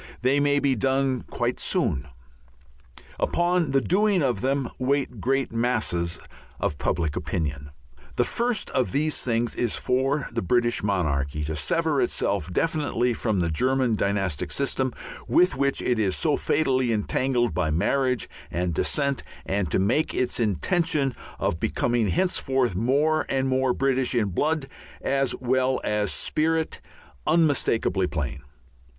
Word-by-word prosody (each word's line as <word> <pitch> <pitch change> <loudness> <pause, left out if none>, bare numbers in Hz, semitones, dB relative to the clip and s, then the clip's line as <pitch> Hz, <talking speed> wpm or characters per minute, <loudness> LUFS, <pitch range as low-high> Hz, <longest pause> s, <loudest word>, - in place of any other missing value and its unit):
They 135 +3 +3
may 145 0 +3
be 140 -1 +2
done 130 +1 +1
quite 120 +1 -2
soon. 95 - 0 1.1
Upon 175 -2 +1
the 135 0 +2
doing 195 0 +2
of 125 -7 0
them 135 0 0
wait 130 -4 -1
great 135 +1 0
masses 110 -8 0 0.4
of 75 - -2
public 80 -3 -1
opinion. 70 -4 -3 0.5
The - - +3
first 235 -2 -1
of 130 -1 0
these 150 +2 0
things 120 -1 0
is 120 -3 0
for 135 +3 0
the 115 0 -2
British 120 +5 +1
monarchy 75 -7 -1
to 80 +1 -3
sever 75 -3 +1
itself 85 +4 -1
definitely 145 - 0
from 110 -5 0
the 85 -1 0
German 130 +6 +1
dynastic 100 -6 -1
system, 130 -2 0 0.4
with 175 +7 +4
which 140 +1 0
it 120 -2 +1
is 95 -4 +1
so 155 -3 +2
fatally 130 -5 +1
entangled 120 +1 0
by 85 -1 0
marriage 125 - +1 0.2
and 90 0 -1
descent, 140 - 0 0.2
and 95 -3 -1
to - - +1
make 115 +12 +1
its 125 - 0
intention 135 - +1 0.2
of 80 - -1
becoming 120 +3 0
henceforth 135 - +1
more 140 - +1
and 135 0 +1
more 130 0 +2
British 130 -1 0
in 110 -4 +2
blood 150 - 0 0.3
as 135 -1 0
well 130 +1 +1
as 105 -1 0
spirit, 160 +1 0 0.5
unmistakably 145 - +2
plain. 75 -3 -3
125 Hz, 140 wpm, -25 LUFS, 100-140 Hz, 1.1 s, with